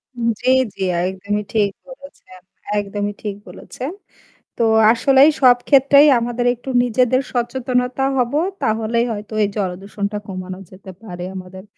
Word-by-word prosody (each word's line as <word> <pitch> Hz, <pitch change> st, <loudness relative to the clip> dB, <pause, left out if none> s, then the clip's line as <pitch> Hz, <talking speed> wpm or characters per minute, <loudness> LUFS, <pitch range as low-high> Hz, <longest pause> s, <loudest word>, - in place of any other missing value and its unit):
হুম। 235 Hz, -1 st, -2 dB
জি, -, -, +1 dB, 0.3 s
জি, -, -, -10 dB
আ -, -, 0 dB
একদমই 200 Hz, +2 st, -3 dB
ঠিক 210 Hz, -3 st, +2 dB, 0.2 s
বলেছেন। 265 Hz, -9 st, -14 dB, 0.4 s
একদমই 205 Hz, 0 st, -3 dB
ঠিক 205 Hz, -2 st, -4 dB
বলেছেন। 260 Hz, +5 st, -8 dB, 0.7 s
তো -, -, -1 dB, 0.3 s
আসলেই 270 Hz, +4 st, +5 dB
সব 250 Hz, -1 st, +7 dB
ক্ষেত্রেই 280 Hz, +1 st, +6 dB
আমাদের 240 Hz, +1 st, -2 dB
একটু 245 Hz, +2 st, -13 dB
নিজেদের 250 Hz, +1 st, +2 dB
সচেতনতা 250 Hz, +1 st, -1 dB
হবো। 250 Hz, +4 st, +1 dB, 0.2 s
তাহলেই 225 Hz, +2 st, 0 dB
হয়তো 210 Hz, 0 st, -8 dB
এই 205 Hz, -, +2 dB
জলদূষণটা 200 Hz, +2 st, -3 dB
কমানো 185 Hz, -1 st, -7 dB
যেতে 190 Hz, 0 st, -12 dB
পারে 180 Hz, -4 st, -7 dB
আমাদের 185 Hz, 0 st, -9 dB
225 Hz, 140 wpm, -19 LUFS, 200-250 Hz, 0.7 s, সব